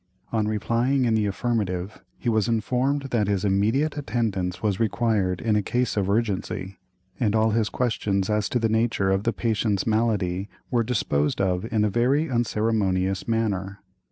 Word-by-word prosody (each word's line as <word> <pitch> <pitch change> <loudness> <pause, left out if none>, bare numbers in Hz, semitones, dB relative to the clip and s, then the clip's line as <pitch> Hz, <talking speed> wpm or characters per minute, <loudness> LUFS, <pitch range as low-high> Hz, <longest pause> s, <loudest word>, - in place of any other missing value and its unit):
On 110 -2 0
replying 120 +5 +1
in 115 - +2
the 110 -2 +2
affirmative, 100 -3 -2 0.2
he - - -7
was 110 -3 +2
informed 130 +4 0
that 110 -5 +1
his 100 -1 0
immediate 110 +11 +1
attendance 100 -9 -2
was 100 -3 0
required 110 -5 +1
in 110 -2 +1
a 105 - +3
case 125 +4 -1
of 100 -2 0
urgency, 100 -3 -2 0.4
and 110 -3 +1
all 110 0 +3
his 110 -1 +1
questions 100 -6 0
as 105 -1 0
to - - 0
the 115 -2 +1
nature 110 -3 +1
of 95 +1 0
the 115 - +3
patient's 110 -3 0
malady 105 -4 0 0.2
were 120 -2 +3
disposed 75 - 0
of 95 +2 0
in 105 -2 +2
a - - +2
very 130 +7 +1
unceremonious 105 -5 0
manner. 100 -4 -1
110 Hz, 165 wpm, -25 LUFS, 95-115 Hz, 0.4 s, a